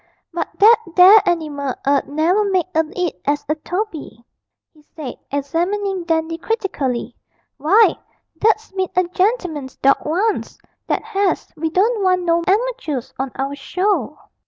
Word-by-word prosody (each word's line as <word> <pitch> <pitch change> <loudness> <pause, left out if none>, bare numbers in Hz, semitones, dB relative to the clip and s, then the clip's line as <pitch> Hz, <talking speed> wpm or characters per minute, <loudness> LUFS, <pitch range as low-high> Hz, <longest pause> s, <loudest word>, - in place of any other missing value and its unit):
But 345 - -2
that 445 +3 +7 0.2
there 385 +4 +8
animal 290 -6 -2
'ud 280 0 +2
never 325 +8 +1
make 380 -4 +1
a 320 - +3 0.2
'it 355 -2 -2
as 290 0 -1
a 305 - +1
Toby,' 310 - -5 0.5
he 305 - -22
said, 295 -2 -8
examining 350 +7 -2
Dandy 325 0 -1
critically: 285 - -2 0.4
'why, 395 +10 +4 0.4
that's 440 +3 +1
bin 380 -1 -2
a 365 - +4
gen'leman's 360 - -1
dawg 275 +1 +2
once, 385 +8 -1 0.3
that - - -1
has 400 -5 -1
we 320 +1 -2
don't 420 +7 +1
want 365 -1 +2
no 340 0 +2
amatoors 405 - -1
on 265 -1 -2
our 275 +1 -3
show.' 310 - -1
345 Hz, 140 wpm, -19 LUFS, 295-400 Hz, 0.5 s, there